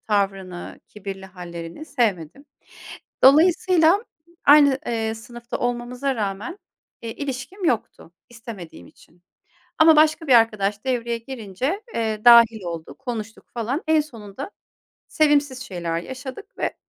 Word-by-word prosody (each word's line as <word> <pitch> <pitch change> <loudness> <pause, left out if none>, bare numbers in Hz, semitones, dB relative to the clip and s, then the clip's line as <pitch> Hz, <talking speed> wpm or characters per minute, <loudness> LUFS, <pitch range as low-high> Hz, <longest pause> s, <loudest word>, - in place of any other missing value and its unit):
Tavrını, 195 -3 -2
kibirli 195 -2 -8
hâllerini 175 - -8
sevmedim. 235 - -2 0.8
Dolayısıyla 340 - +5 0.4
aynı, 285 -2 +6
eee, 225 -1 -1
sınıfta 235 +1 -8
olmamıza 245 +3 -2
rağmen, 210 - -4 0.4
eee, 230 - -5
ilişkim 285 +8 -5
yoktu, 230 - -2 0.2
istemediğim 215 - -10
için 175 +1 -22 0.6
ama 315 0 +7
başka 310 +1 +3
bir 270 - +3
arkadaş 215 -3 +3
devreye 235 -2 -1
girince, 255 - -4
eee, 220 -1 -2
dâhil 230 -3 +7
oldu, 165 -2 -6
konuştuk 225 -4 -6
falan. 240 +6 -2
En 315 0 +4
sonunda 235 - -8 0.6
sevimsiz 290 -4 +2
şeyler 170 -8 -3
yaşadık 260 - -9
ve, - - -1
235 Hz, 115 wpm, -23 LUFS, 200-280 Hz, 0.8 s, ama